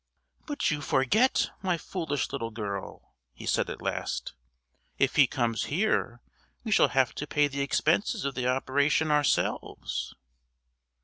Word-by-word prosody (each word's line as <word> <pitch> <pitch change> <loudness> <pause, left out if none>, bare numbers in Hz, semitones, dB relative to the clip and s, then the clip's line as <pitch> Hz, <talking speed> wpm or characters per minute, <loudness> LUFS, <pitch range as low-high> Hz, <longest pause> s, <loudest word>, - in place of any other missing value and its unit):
"But 290 - 0
you 150 -1 -2
forget, 190 - +2
my 185 -3 0
foolish 160 -4 -3
little 115 -4 -3
girl," 100 -3 -6 0.2
he - - -10
said - - +1
at - - -7
last, - - -3 0.6
"if 135 -1 +2
he 140 -3 +6
comes 115 -6 -1
here 145 - 0 0.4
we 225 - -4
shall - - +6
have 135 -3 +2
to 150 - -5
pay 145 0 +2
the 140 0 -4
expenses 175 - +1
of 140 - -1
the 125 -1 -2
operation 140 +4 +2
ourselves." 150 -2 0
140 Hz, 140 wpm, -28 LUFS, 130-160 Hz, 0.6 s, he